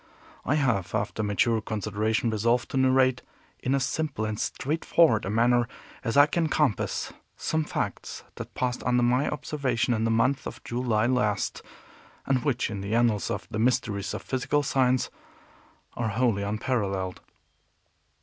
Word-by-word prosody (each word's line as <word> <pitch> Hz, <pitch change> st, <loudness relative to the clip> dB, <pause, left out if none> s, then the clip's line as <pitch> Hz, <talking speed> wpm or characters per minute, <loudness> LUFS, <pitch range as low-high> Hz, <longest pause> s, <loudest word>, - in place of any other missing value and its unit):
I 145 Hz, -, +2 dB
have, 120 Hz, -11 st, 0 dB
after -, -, -1 dB
mature 110 Hz, +2 st, +1 dB
consideration 110 Hz, +2 st, -1 dB
resolved 115 Hz, +3 st, +1 dB
to -, -, -1 dB
narrate, 130 Hz, -1 st, +3 dB, 0.4 s
in 130 Hz, +2 st, +1 dB
as 135 Hz, -1 st, +1 dB
simple 155 Hz, -9 st, -2 dB
and 110 Hz, 0 st, -3 dB
straightforward 155 Hz, -4 st, +2 dB
a -, -, -2 dB
manner 120 Hz, +2 st, +3 dB, 0.4 s
as 115 Hz, +1 st, -1 dB
I 145 Hz, -, +9 dB
can 160 Hz, +1 st, 0 dB
compass, 145 Hz, -11 st, 0 dB, 0.2 s
some 160 Hz, 0 st, 0 dB
facts -, -, -4 dB
that -, -, -8 dB
passed 125 Hz, 0 st, -1 dB
under 125 Hz, -1 st, +2 dB
my 125 Hz, +4 st, +2 dB
observation, 135 Hz, -5 st, -1 dB
in 110 Hz, -1 st, 0 dB
the 115 Hz, -, +1 dB
month 115 Hz, +5 st, +1 dB
of -, -, -9 dB
July 120 Hz, -3 st, 0 dB
last, 110 Hz, -5 st, 0 dB, 0.6 s
and 130 Hz, -3 st, +1 dB
which, 130 Hz, -5 st, 0 dB
in 100 Hz, -2 st, -4 dB
the 100 Hz, +3 st, -2 dB
annals 115 Hz, -3 st, +2 dB
of -, -, -4 dB
the 110 Hz, -, -2 dB
mysteries 115 Hz, -4 st, 0 dB
of -, -, -6 dB
physical 135 Hz, +3 st, 0 dB
science, 130 Hz, -2 st, +1 dB, 0.8 s
are 115 Hz, -2 st, -1 dB
wholly 115 Hz, -2 st, +1 dB
unparalleled. 100 Hz, -3 st, -2 dB
120 Hz, 150 wpm, -27 LUFS, 110-130 Hz, 0.8 s, I